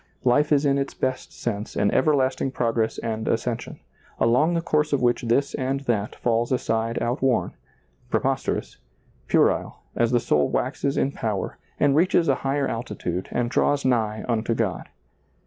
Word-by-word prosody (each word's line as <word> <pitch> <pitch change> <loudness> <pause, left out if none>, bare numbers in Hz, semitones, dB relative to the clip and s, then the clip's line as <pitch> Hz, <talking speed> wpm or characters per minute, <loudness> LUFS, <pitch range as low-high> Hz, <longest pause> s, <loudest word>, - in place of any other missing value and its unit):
Life 145 +5 +3
is 145 0 +3
in 140 0 +3
its 140 - -3
best 130 0 -2
sense 105 -2 -4
an 100 - +2
everlasting 135 -2 +2
progress 115 -3 -1
and 110 -1 -3
ascension, 115 +1 -2 0.4
along 145 +9 +3
the - - +2
course 150 -2 0
of 140 - +2
which 120 0 +2
this 120 +4 +1
and 135 +1 -1
that 110 -6 -1
falls 120 +1 0
aside 115 -2 0
outworn, 125 +1 0 0.6
preposterous, - - -1 0.5
puerile, - - +1
as 120 -1 +2
the 120 0 +3
soul 75 - +1
waxes 140 0 -1
in 135 - +1
power 105 -7 -3 0.2
and 145 -1 +3
reaches 170 +1 +3
a 140 - +4
higher 140 +1 0
altitude 100 -6 -4
and 120 -1 -1
draws 145 -1 +1
nigh 110 -4 0
unto 115 -1 0
God. 110 -6 -2
120 Hz, 155 wpm, -24 LUFS, 115-140 Hz, 0.6 s, a